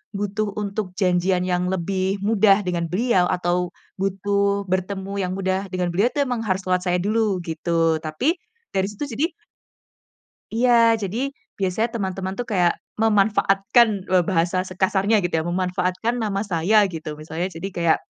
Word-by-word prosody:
butuh 205 +1 -2
untuk 200 -2 -3
janjian 180 -1 +2
yang 180 -1 0
lebih 190 +2 -1
mudah 205 -1 +4
dengan 175 -3 -2
beliau 185 +1 +2
atau 180 0 0 0.3
butuh 200 +1 0
bertemu 190 +1 -2
yang 180 - -3
mudah 190 0 -1
dengan 180 -1 0
beliau 190 +6 +2
itu 290 - +1
memang 250 -3 -2
harus 190 -1 0
lewat 185 0 +1
saya 180 0 +1
dulu 210 -3 +1
gitu 165 0 0
tapi, 160 - -1 0.3
dari 190 0 +1
situ 210 +7 -6
jadi 270 +7 0 1.3
Iya 230 -1 +5
jadi 195 +4 -3 0.4
biasanya 195 +4 0
teman-teman 190 -2 -3
tuh 245 - -2
kayak 180 -6 +2 0.2
memanfaatkan 205 0 +3
loh 185 -1 +3
bahasa 180 +1 +1
sekasarnya 190 +3 +1
gitu 175 - -2
ya - - -8
memanfaatkan 185 +4 -1
nama 200 -2 -1
saya 200 +4 +3
gitu 155 -4 -6
misalnya 160 +4 -3
jadi 175 +2 -5
kayak, 170 -2 +3
190 Hz, 150 wpm, -22 LUFS, 180-205 Hz, 1.3 s, Iya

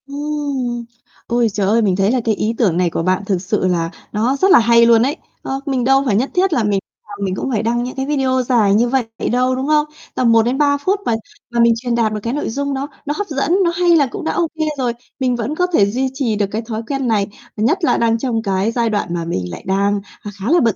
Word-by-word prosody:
Ừm! 280 -4 -3 0.4
Ôi 240 -1 +2
trời 200 -1 0
ơi, 225 +3 +3
mình 195 -4 +2
thấy 195 +2 +2
là 255 - +1
cái 220 -2 +2
ý 215 +3 -1
tưởng 185 -8 +2
này 180 -1 +2
của 165 - -2
bạn 185 +2 +1
thực 190 -3 -1
sự 185 0 0
là 170 -2 0 0.2
nó 230 +6 +1
rất 380 +7 +3
là - - +8
hay 235 0 +5
luôn 230 -1 +5
ấy. 285 +6 -1 0.2
Ờ, 270 - -3
mình 265 -4 -1
đâu 270 +2 +4
phải 220 -6 +1
nhất 250 +7 +1
thiết 370 -1 +2
là 240 - +1
mình 205 -2 +1 0.3
nào 205 0 -9
mình 190 -1 -1
cũng 265 - -3
phải 225 -3 0
đăng 240 +1 0
mấy 250 - -5
cái 265 - -1
video 265 -3 +1
dài 230 -5 +3
như 235 +3 +3
vậy 265 0 +1 0.3
đâu, 255 +1 +2
đúng 260 +2 -3
không? 300 0 +3 0.3
Tầm 245 -2 +3
1-3 265 +6 +3
phút 380 +8 0
mà 230 - +1 0.4
và 235 - 0
mình 235 0 +5
truyền 240 +1 -2
đạt 225 -2 +1
được 210 - -2
cái 235 - -2
nội 295 - -2
dung 280 +4 -2
đó 275 +1 -3 0.2
nó 295 - -1
hấp 410 - -3
dẫn, 285 +1 -1
nó 340 - +2
hay 345 0 +3
là 290 -4 +4
cũng 250 - -7
đã - - +1
ô 340 -2 0
kê 315 - +1
rồi. 250 -3 0 0.3
Mình 255 -2 +1
vẫn 240 +5 -3
có 360 +2 +1
thể 205 - +5
duy 255 +6 -1
trì 260 -5 -1
được 205 -1 +1
cái 220 - -2
thói 225 -1 -5
quen 275 -1 -2
này, 210 -3 +1 0.3
nhất 310 - +1
là - - +3
đang 230 -1 +2
trong 230 -2 -1
cái 195 +1 0
giai 235 -1 0
đoạn 205 -5 -2
mà 170 -1 -2
mình 95 - -3
lại - - -8
đang, 200 +1 +1 0.2
à, 205 - -7
khá 210 +8 -2
là 350 - +5
bận 230 - +2
235 Hz, 270 wpm, -18 LUFS, 210-275 Hz, 0.4 s, là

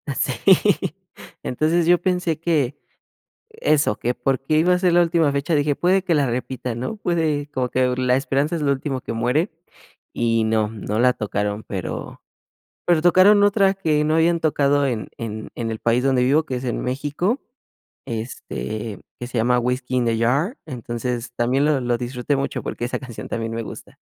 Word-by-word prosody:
Sí. - - 0 1.1
Entonces, 160 +6 +1
yo 175 +1 +4
pensé 180 -4 0
que 150 -5 0 0.7
eso, 155 - +1
que 120 - -1
por 135 +1 0
qué 155 +3 +1
iba 175 +3 +4
a 180 - +1
ser 180 -2 +2
la 175 - +6
última 165 -3 +2
fecha, 140 +4 0
dije: 145 0 +1
"Puede 185 +4 +2
que 175 -3 +1
la 145 -2 +2
repitan", 125 -1 -3
¿no? 170 - -4
Puede 160 -6 0
como 125 -1 -1
que 125 0 +1
la 125 -1 +2
esperanza 140 +4 0
es 160 - -3
lo 140 -1 +2
último 135 -1 -3
que - - -5
muere, 125 - 0 0.6
y 115 -1 +1
no, 110 -1 +1
no 105 0 -4
la 125 +1 +4
tocaron, 105 -1 -2
pero 95 -3 -6 0.6
pero 170 -3 +3
tocaron 185 +4 +6
otra 200 -1 +4
que 155 -6 +1
no 155 +1 +2
habían 165 +1 +3
tocado 145 -2 +2
en 115 -4 -3
en 110 -2 -6
en 115 -1 -3
el 110 - -5
país 120 +2 +1
donde 130 -2 +3
vivo, 145 +5 +3
que 130 - -4
es 125 - -6
en 120 - -2
México, 145 - -1 0.6
este, 110 - -5 0.2
que 120 - -5
se 125 - -5
llama: 125 +2 +3
"Whisky 125 +1 -2
in 125 - +1
the 115 -1 +1
Jar", 140 - +1
entonces 120 -2 -4
también 130 +4 +1
lo 150 -2 +2
lo 120 -1 0
disfruté 125 +3 -2
mucho 140 - -3
porque 120 - -4
esa 125 - -2
canción 125 -4 -8
también 115 0 -3
me 115 - -2
gusta. - - -10
135 Hz, 185 wpm, -22 LUFS, 120-160 Hz, 1.1 s, la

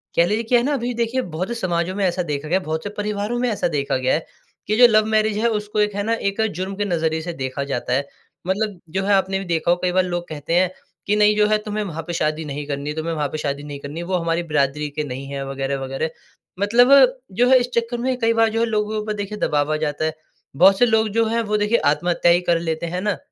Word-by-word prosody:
कह 170 - +5
लीजिए 215 +5 0
क्या 245 - +6
है 240 - -1
ना? 290 - +1
अभी 245 -2 -2
देखिए 235 +2 -1 0.2
बहुत 185 - -1
से 235 - -3
समाजों 180 -3 -1
में 200 - -1
ऐसा 180 0 0
देखा 150 -1 -4
गया 180 +4 +2
है 190 - -12
बहुत 160 +1 -3
से 205 - -4
परिवारों 210 +3 -2
में 250 0 +1
ऐसा 210 - 0
देखा 140 -1 0
गया 130 0 +1
है 160 - -1 0.4
कि 215 - +1
जो 245 0 +9
लव 215 -1 +4
मैरेज 215 -1 +2
है 230 - +2
उसको 210 -1 -2
एक 210 -1 +1
है 205 - -1
ना? 225 +2 0
एक 200 -1 -1
जुर्म 190 +3 -4
के 205 +1 -1
नज़रिए 160 -4 0
से 170 +2 -5
देखा 130 +2 -3
जाता 125 -3 -2
है। 140 +2 +1 0.4
मतलब 200 0 -1 0.2
जो 195 - +1
है 205 - +3
आपने 190 0 +2
भी 195 - -6
देखा 170 -1 +1
होगा 175 - +2
कई - - +1
बार 185 +1 +3
लोग 175 -1 -3
कहते 155 +1 -5
है 185 - +3 0.4
कि 205 - +2
नहीं 210 0 +4
जो 210 0 +4
है 215 0 +3
तुम्हे 210 0 -2
वहाँ 165 -5 -5
पे 175 - -3
शादी 155 -1 -1
नहीं 145 0 -5
करनी 140 0 -3
है, 150 - -4
तुम्हे 160 +1 -2
वहाँ 150 -2 -1
पे 155 - -3
शादी 145 -1 -3
नहीं 145 -1 -7
करनी 145 +4 -7
है, 175 - -5
वो 185 - -1
हमारी 170 0 0
बिरादरी 150 -1 0
के 150 +1 -3
नहीं 135 -1 -6
है 140 -1 -3
वगैरह-वगैरह। 135 +2 -3 0.5
मतलब 235 +5 +4 0.4
जो 240 +6 +2
है 260 - +7
इस 245 - -1
चक्कर 235 +1 0
में 255 +1 -1
कई 230 -1 +2
बार 225 -1 +3
जो 225 - -2
है 230 - +3
लोगों 215 -2 -1
के - - -1
ऊपर 215 0 -3
देखिए 210 0 -5
दबाव 145 -3 0
आ - - +1
जाता 150 +1 -1
है। 160 - -1 0.4
बहुत 190 +5 +6
से 245 - +6
लोग 220 -1 +2
जो 230 - +4
है 230 +1 0
वो 210 0 +1
देखिए 210 +3 +2
आत्महत्या 175 +2 +2
ही 175 - +4
कर 170 - +4
लेते 165 0 -3
है 180 +2 -3
ना? 205 -5 -1
185 Hz, 280 wpm, -21 LUFS, 155-215 Hz, 0.5 s, जो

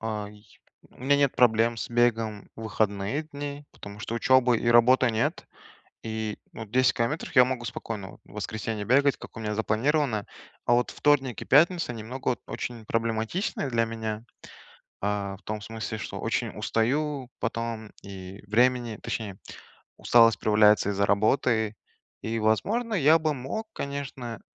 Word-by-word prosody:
э, 110 -2 -3
й 105 0 -19 0.3
у - - -20
меня 145 +1 +4
нет 140 -2 +2
проблем 115 -1 +4
с 115 - -5
бегом 115 -3 +1
в 115 - -8
выходные 110 +5 -1
дни, 145 -1 -7
потому 100 0 -11
что 110 - -5
учебы 125 0 +4
и 115 - -4
работы 120 +1 +5
нет, 110 +1 -1 0.6
и, 110 -1 -3 0.2
ну, - - -8
вот 110 -1 -9
10 130 0 +4
километров 140 +5 -2
я 125 - +9
могу 125 -2 -2
спокойно 105 -3 -6
в - - -19
воскресенье 105 0 -4
бегать, 140 +3 +3
как - - -12
у - - -7
меня 105 -1 -2
запланировано, 110 +1 +1 0.4
а - - +1
вот 120 +1 +2
вторник 135 -4 +1
и - - -6
пятница- 165 +1 +4
немного, 115 +4 -4
вот, 125 - -2
очень 115 -3 -5
проблематичные 115 - -1
для 115 -1 +2
меня, 110 -1 -4 0.8
а, 100 -1 -2
в - - -24
том 110 0 -4
смысле, 110 0 -5
что 100 - -6
очень - - -1
устаю 135 +3 -1
потом, 115 -1 -3
и 95 0 -9
времени 120 +1 +2
Точнее, 100 -4 -4 0.6
усталость 115 -1 +5
проявляется 105 -1 +4
из-за 100 0 +1
работы. 110 +1 +2 0.5
И, 115 +1 -2
возможно, 205 - +1
я 160 -2 +5
бы 155 -1 0
мог, 140 - -5
конечно, 135 -5 -5
115 Hz, 155 wpm, -27 LUFS, 110-130 Hz, 0.8 s, я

